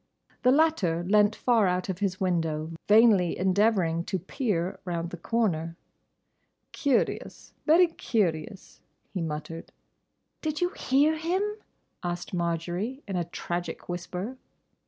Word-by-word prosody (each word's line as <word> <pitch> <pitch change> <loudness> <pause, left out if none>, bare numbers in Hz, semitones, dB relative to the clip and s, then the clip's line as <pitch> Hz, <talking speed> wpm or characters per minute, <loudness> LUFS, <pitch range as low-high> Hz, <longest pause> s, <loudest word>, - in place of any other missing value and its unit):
The 250 - +5
latter 260 - +2
leant 210 +3 +4
far 230 -5 +3
out 180 0 0
of 190 -2 -3
his 195 -1 -1
window 165 -4 -1 0.2
vainly 210 -5 +5
endeavouring 185 -3 +2
to 190 - -1
peer 190 - -2
round 170 -1 -3
the 175 - -6
corner. 170 -5 -1 0.9
"Curious, 280 -3 -1
very 335 +4 +7
curious," 195 - -2 0.3
he 185 - -2
muttered. 160 +1 -5 0.7
"Did 310 -1 -2
you 355 - +2
hear 290 0 +2
him?" 345 +5 0 0.6
asked 175 +1 -4
Marjory, 175 - -2
in 195 - -3
a 175 -1 0
tragic 175 0 -5
whisper. 180 +7 -5
185 Hz, 120 wpm, -27 LUFS, 170-235 Hz, 0.9 s, very